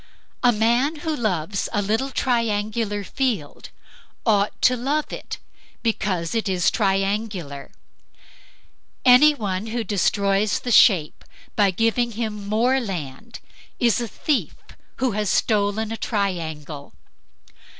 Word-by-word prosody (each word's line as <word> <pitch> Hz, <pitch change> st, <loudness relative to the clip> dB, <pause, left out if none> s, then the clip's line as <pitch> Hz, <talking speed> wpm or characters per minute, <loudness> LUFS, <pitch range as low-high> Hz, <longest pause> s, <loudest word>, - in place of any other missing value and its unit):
A 245 Hz, -, +5 dB
man 240 Hz, +8 st, +1 dB
who 315 Hz, -1 st, 0 dB
loves 195 Hz, -, -1 dB
a 205 Hz, -, 0 dB
little 220 Hz, +7 st, 0 dB
triangular 220 Hz, -4 st, -1 dB
field 215 Hz, -, -3 dB, 0.6 s
ought 205 Hz, -3 st, +2 dB
to 250 Hz, -, +5 dB
love 280 Hz, +5 st, -2 dB
it -, -, -6 dB, 0.5 s
because 190 Hz, -7 st, -1 dB
it 225 Hz, -3 st, -1 dB
is 180 Hz, -2 st, +2 dB
triangular; 195 Hz, -, -1 dB, 1.4 s
anyone 245 Hz, -7 st, +4 dB
who 230 Hz, +1 st, -2 dB
destroys 200 Hz, +1 st, +1 dB
the 245 Hz, -, -3 dB
shape, 180 Hz, -9 st, +4 dB, 0.3 s
by 205 Hz, -2 st, +4 dB
giving 230 Hz, +4 st, 0 dB
him 210 Hz, -2 st, -4 dB
more 245 Hz, +5 st, +2 dB
land, 185 Hz, -, -6 dB, 0.4 s
is 240 Hz, 0 st, +2 dB
a 235 Hz, -, -3 dB
thief 290 Hz, +5 st, -1 dB, 0.4 s
who 260 Hz, -1 st, 0 dB
has 210 Hz, -1 st, -1 dB
stolen 210 Hz, +1 st, +1 dB
a 225 Hz, -, -3 dB
triangle. 160 Hz, -10 st, -3 dB
215 Hz, 115 wpm, -23 LUFS, 195-235 Hz, 1.4 s, A